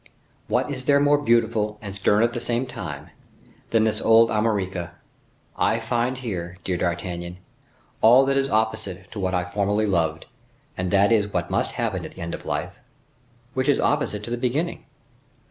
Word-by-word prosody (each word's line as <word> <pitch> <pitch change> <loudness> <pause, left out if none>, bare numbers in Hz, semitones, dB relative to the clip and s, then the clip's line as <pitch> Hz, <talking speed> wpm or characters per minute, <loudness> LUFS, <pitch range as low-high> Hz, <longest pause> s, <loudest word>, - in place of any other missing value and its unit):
What - - 0
is 130 -2 -5
there 140 0 +5
more 145 0 +4
beautiful, 115 -4 +1
and 100 -3 -7
stern 105 +2 +2
at 120 0 +1
the - - -2
same 120 +2 -1
time, - - -7 0.6
than 115 -1 +3
this 110 -1 0
old 115 0 +5
Armorica. 95 -6 -1 0.6
I 115 - +1
find 120 +2 -1
here, 95 -8 -5
dear 90 - -1
D'Artagnan, 85 0 -3 0.6
all 125 +4 +7
that 135 0 +1
is 135 0 +1
opposite 110 -5 -1
to 105 - -6
what 95 -1 0
I 90 0 -1
formerly 100 +2 0
loved, 80 -5 0 0.5
and 90 0 -2
that 100 +3 +4
is 105 -3 +3
what 85 -3 -2
must - - 0
happen - - -2
at - - -8
the - - -11
end 85 - -4
of - - -7
life, - - -3 0.7
which 130 +2 0
is 140 - +3
opposite 105 0 0
to 115 - -6
the 120 - -1
beginning. 135 +8 -2
110 Hz, 180 wpm, -24 LUFS, 95-120 Hz, 0.7 s, all